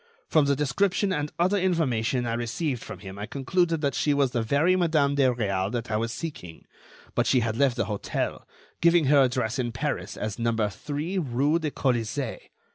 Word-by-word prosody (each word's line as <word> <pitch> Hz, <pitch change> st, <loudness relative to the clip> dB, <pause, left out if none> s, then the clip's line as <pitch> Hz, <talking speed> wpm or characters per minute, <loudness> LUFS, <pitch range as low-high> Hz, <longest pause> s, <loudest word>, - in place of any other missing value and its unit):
From 155 Hz, -3 st, +4 dB
the 140 Hz, 0 st, +2 dB
description 185 Hz, +8 st, +1 dB
and 150 Hz, -3 st, -2 dB
other 185 Hz, +4 st, +2 dB
information 130 Hz, -10 st, +1 dB
I 115 Hz, -, -1 dB
received 120 Hz, +3 st, -2 dB
from 95 Hz, -, -9 dB
him, 95 Hz, 0 st, -9 dB
I 105 Hz, -, -4 dB
concluded 165 Hz, +5 st, 0 dB
that 140 Hz, -2 st, 0 dB
she 145 Hz, -1 st, +1 dB
was 140 Hz, -3 st, +2 dB
the 120 Hz, -, 0 dB
very 145 Hz, +10 st, +2 dB
Madame 155 Hz, -6 st, +2 dB
de 140 Hz, -2 st, +3 dB
Réal 100 Hz, -6 st, 0 dB
that 120 Hz, -1 st, -3 dB
I 105 Hz, -, +1 dB
was 115 Hz, +1 st, -2 dB
seeking; 115 Hz, -, -7 dB, 0.5 s
but -, -, +1 dB
she 125 Hz, -, +4 dB
had 110 Hz, -1 st, -1 dB
left 135 Hz, -1 st, +2 dB
the -, -, 0 dB
hotel, 105 Hz, -2 st, -3 dB, 0.3 s
giving 170 Hz, -1 st, +5 dB
her 140 Hz, +1 st, +5 dB
address 125 Hz, -1 st, 0 dB
in 120 Hz, -2 st, -1 dB
Paris 115 Hz, -, -3 dB
as 105 Hz, +1 st, -4 dB
number 115 Hz, -2 st, +1 dB
three 150 Hz, -, -3 dB
rue 145 Hz, +2 st, +1 dB
de 155 Hz, -2 st, -2 dB
Colisée. 125 Hz, -1 st, -1 dB
135 Hz, 195 wpm, -26 LUFS, 115-155 Hz, 0.5 s, giving